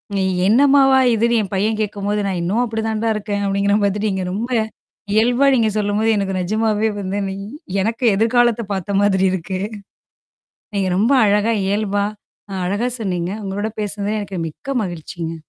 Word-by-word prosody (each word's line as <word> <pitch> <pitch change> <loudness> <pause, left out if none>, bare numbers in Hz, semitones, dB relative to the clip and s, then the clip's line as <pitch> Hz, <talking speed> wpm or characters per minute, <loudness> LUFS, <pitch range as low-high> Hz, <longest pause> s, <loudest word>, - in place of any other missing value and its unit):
நீ 195 - +1 0.2
என்னம்மாவா 270 +3 +5 0.2
இதுன்னு 235 +1 +2
என் 200 - -5
பையன் 215 +3 0
கேட்கும்போது 205 0 -2
நான் 185 -2 -2
இன்னும் 205 +8 +1
அப்படி 220 -1 -3
தான்டா 220 +1 -1
இருக்கேன் 205 -1 -3
அப்படிங்கிற 200 +1 +1
மாதிரி, 200 +1 0
நீங்க 190 -1 -2
ரொம்ப 230 +5 -3 0.7
இயல்பா 245 +5 +3
நீங்க 225 -3 +2
சொல்லும்போது 210 +2 +1
எனக்கு 195 -1 -1
நிஜமாவே 215 +3 +1
வந்து 195 +1 -3
நீ 190 - -4 0.5
எனக்கு 230 +4 -1
எதிர்காலத்த 235 +2 +3
பார்த்த 195 +1 -2
மாதிரி 195 -2 +3
இருக்கு. 185 +1 -3 1.2
நீங்க 195 -2 0
ரொம்ப 220 +8 +3
அழகா 210 +2 +2
இயல்பா, 205 0 0 0.5
அ - - -5
அழகா 205 +6 0
சொன்னீங்க. 180 -3 -2
உங்களோட 205 +3 -3
பேசினதில 205 +1 -2
எனக்கு 195 -3 -5
மிக்க 215 - -6
மகிழ்ச்சிங்க. 165 -1 -6
205 Hz, 150 wpm, -19 LUFS, 195-225 Hz, 1.2 s, என்னம்மாவா